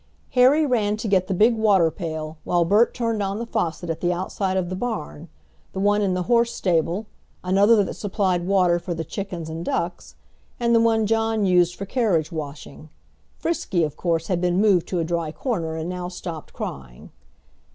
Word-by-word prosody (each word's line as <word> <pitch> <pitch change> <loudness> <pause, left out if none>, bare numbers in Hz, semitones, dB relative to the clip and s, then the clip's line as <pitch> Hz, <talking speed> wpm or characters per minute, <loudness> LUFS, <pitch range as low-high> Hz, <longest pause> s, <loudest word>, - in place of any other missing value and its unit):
Harry 270 +5 +5
ran 215 -6 +1
to 220 - -4
get 190 -2 +2
the - - -4
big 225 +5 +4
water 200 -7 +3
pail, 155 -2 -6
while 175 -1 +1
Bert 210 +7 +4
turned 230 -3 -2
on 195 0 -2
the 235 - -4
faucet 175 -6 -2
at 165 -1 -3
the 175 - +1
outside 185 +1 -2
of 185 -2 0
the 185 - -3
barn, 185 -7 -5 0.4
the 190 - -4
one 205 +1 +2
in 190 -3 +1
the 180 - -1
horse 235 +2 +2
stable, 175 +2 0 0.4
another 200 +4 +4
that - - -4
supplied 185 -3 -1
water 180 -3 +3
for 175 0 -4
the 165 - -3
chickens 180 -1 -6
and 160 +1 -5
ducks, 175 0 -3 0.4
and 235 -1 +2
the 230 - +5
one 225 -1 +3
John 225 -1 +1
used 180 -1 +3
for 195 - -6
carriage 195 - 0
washing. 150 -1 -8 0.5
Frisky, 205 - -1
of 150 -2 -2
course, 165 -2 -1
had 175 -1 -1
been 180 0 +1
moved 200 -5 +3
to 185 - -2
a 170 - +1
dry 165 -1 -2
corner 165 - -3
and 160 +1 -4
now 180 -1 -4
stopped 170 -3 -7
crying. 60 -3 -8
185 Hz, 195 wpm, -23 LUFS, 170-215 Hz, 0.5 s, Harry